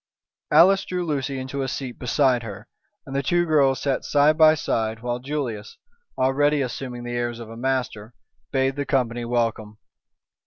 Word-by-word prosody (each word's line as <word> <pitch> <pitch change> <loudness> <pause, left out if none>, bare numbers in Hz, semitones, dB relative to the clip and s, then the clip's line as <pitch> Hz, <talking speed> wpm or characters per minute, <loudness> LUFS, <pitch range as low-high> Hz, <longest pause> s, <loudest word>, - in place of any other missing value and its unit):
Alice 185 +6 +6
drew 180 -1 -3
Lucy 140 -3 -2
into 130 +1 -4
a 135 - -2
seat 130 -1 -5
beside 125 0 +2
her, 105 -1 -9 0.4
and 135 - -7
the 140 - +1
two 175 +5 +1
girls 140 -5 +3
sat 135 -2 0
side 145 +1 +3
by 155 0 +6
side, 110 -6 -2
while 120 0 -2
Julius, 125 -6 -5 0.4
already 145 +2 +2
assuming 125 -1 -6
the 120 0 -5
airs 120 -1 -2
of 115 -1 -9
a - - -9
master, 120 -3 -3 0.4
bade 135 0 0
the 145 - -2
company 120 -3 0
welcome. 115 -3 -2
130 Hz, 165 wpm, -23 LUFS, 120-145 Hz, 0.4 s, Alice